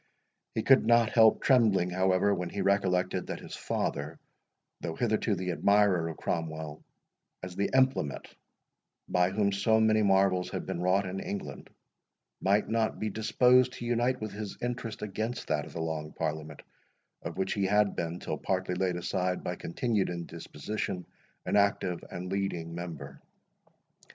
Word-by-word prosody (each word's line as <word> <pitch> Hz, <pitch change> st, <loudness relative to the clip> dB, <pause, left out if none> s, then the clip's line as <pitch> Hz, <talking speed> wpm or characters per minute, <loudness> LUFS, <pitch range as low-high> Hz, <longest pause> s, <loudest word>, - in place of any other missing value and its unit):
He 110 Hz, -, 0 dB
could 135 Hz, -1 st, +6 dB
not 115 Hz, -1 st, +5 dB
help 110 Hz, -2 st, +5 dB
trembling, 110 Hz, -9 st, +4 dB
however, 95 Hz, +2 st, +2 dB
when 90 Hz, -2 st, -3 dB
he 100 Hz, -, -3 dB
recollected 95 Hz, -2 st, +1 dB
that -, -, -4 dB
his -, -, -8 dB
father, 75 Hz, +3 st, -3 dB, 0.6 s
though 80 Hz, -2 st, -4 dB
hitherto 110 Hz, -1 st, +1 dB
the 90 Hz, 0 st, -2 dB
admirer 100 Hz, -2 st, +3 dB
of 80 Hz, -, -6 dB
Cromwell, 80 Hz, -2 st, -4 dB, 0.6 s
as 90 Hz, -1 st, -6 dB
the 100 Hz, -, 0 dB
implement 130 Hz, -, +1 dB, 0.8 s
by 90 Hz, 0 st, +2 dB
whom 100 Hz, +1 st, +1 dB
so 105 Hz, +3 st, +2 dB
many 110 Hz, 0 st, +4 dB
marvels 95 Hz, -2 st, +3 dB
had -, -, -4 dB
been 85 Hz, -, -3 dB
wrought 95 Hz, +2 st, +2 dB
in 95 Hz, +1 st, -4 dB
England, 100 Hz, -, -6 dB, 0.7 s
might 100 Hz, +2 st, +2 dB
not 115 Hz, -1 st, 0 dB
be 110 Hz, -1 st, -2 dB
disposed 125 Hz, +4 st, +4 dB
to 120 Hz, -, -7 dB
unite 120 Hz, +2 st, +1 dB
with 110 Hz, -1 st, -5 dB
his 105 Hz, -1 st, -6 dB
interest 120 Hz, -3 st, -4 dB
against 110 Hz, +4 st, -4 dB
that 75 Hz, -1 st, 0 dB
of -, -, -12 dB
the 80 Hz, -, -4 dB
Long 80 Hz, -1 st, -4 dB
Parliament, 75 Hz, -1 st, -4 dB, 0.6 s
of -, -, -6 dB
which 95 Hz, 0 st, 0 dB
he 100 Hz, -2 st, 0 dB
had 105 Hz, 0 st, +3 dB
been, 85 Hz, +1 st, -3 dB
till -, -, -4 dB
partly 95 Hz, -1 st, -1 dB
laid 90 Hz, 0 st, 0 dB
aside 90 Hz, +1 st, -1 dB
by -, -, -3 dB
continued 105 Hz, +3 st, -1 dB
indisposition, 85 Hz, +2 st, -5 dB, 0.4 s
an -, -, 0 dB
active 100 Hz, -3 st, +1 dB
and 90 Hz, +1 st, -6 dB
leading 90 Hz, -4 st, -2 dB
member. 85 Hz, -5 st, -7 dB
95 Hz, 155 wpm, -29 LUFS, 85-110 Hz, 0.8 s, could